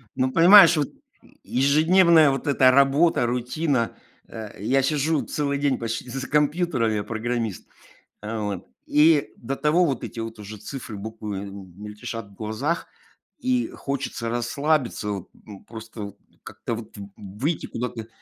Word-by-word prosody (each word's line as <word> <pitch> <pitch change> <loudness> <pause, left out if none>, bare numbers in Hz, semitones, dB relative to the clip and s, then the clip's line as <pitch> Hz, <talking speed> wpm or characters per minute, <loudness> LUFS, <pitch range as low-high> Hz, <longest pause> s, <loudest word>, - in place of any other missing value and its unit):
Ну, 130 0 +1
понимаешь, 175 +3 +8
вот, 145 - 0 0.5
ежедневная 155 +4 +5
вот 135 +3 -4
эта 130 -2 +5
работа, 140 +2 +4
рутина. 125 +1 -1 0.3
Э, 110 -2 -8
я 130 +6 +2
сижу 150 +2 +1
целый 140 -1 -2
день 140 -2 +1
почти 115 +1 -4
з - - -7
за 130 - -5
компьютером- 150 -5 +1
я 105 -1 -1
программист. 115 -3 -3 0.5
Э, 110 +1 -4
вот. 100 -3 -4 0.2
И 150 0 +4
до 135 +4 -4
того 165 +5 +3
вот 135 -6 -2
эти - - -6
вот 115 0 -5
уже 105 +1 -8
цифры 110 +1 -7
буквы, 105 -1 -6
эм, 100 -2 -9
мельтешат 105 +1 -7
в 100 - -19
глазах, 115 +10 -2 0.5
и 255 -2 0
хочется 135 -4 -4
расслабиться, 120 -1 -1
вот, 100 -3 -5
ну, 100 -3 -14
просто 110 -1 -10
вот 100 -1 -8 0.3
как-то 115 - -5
вот 110 -1 -10
в 100 -1 -8
выйти 110 - -3
куда-то. 115 -2 -5
125 Hz, 150 wpm, -24 LUFS, 110-145 Hz, 0.5 s, понимаешь